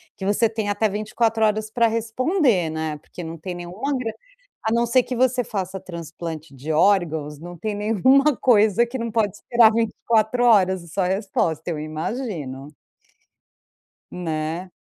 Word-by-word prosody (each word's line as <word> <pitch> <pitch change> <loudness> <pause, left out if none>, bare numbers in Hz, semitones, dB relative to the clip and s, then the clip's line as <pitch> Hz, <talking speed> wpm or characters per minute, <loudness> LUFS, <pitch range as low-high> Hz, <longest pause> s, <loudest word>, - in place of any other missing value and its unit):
que 190 - -6
você 210 +3 +2
tem 220 -2 -3
até 205 +1 +1
24 220 +2 0
horas 215 0 0
pra 235 +1 +2
responder, 230 - +1
né? 160 -1 -3
Porque 175 +4 -10
não 165 +1 -6
tem 180 +3 -6
nenhuma 185 +11 -4
gran 245 -3 -2 0.5
a 220 - 0
não 235 +1 +2
ser 250 +2 +4
que 250 +1 -5
você 250 0 +2
faça 190 -2 -4
transplante 165 -3 -7
de 145 +5 -5
órgãos, 160 -4 +2
não 175 +2 -9
tem 215 +4 -3
nenhuma 245 +8 +3
coisa 220 -1 +4
que 240 +3 -10
não 230 0 -2
pode 215 -4 0
esperar 235 -2 +4
24 230 +1 +1
horas. 190 -5 +4
Só 195 - -1
resposta, 180 -4 -1
eu 155 - -3
imagino. 155 - -5 1.4
Né? 165 +1 -3
205 Hz, 155 wpm, -23 LUFS, 170-230 Hz, 1.4 s, ser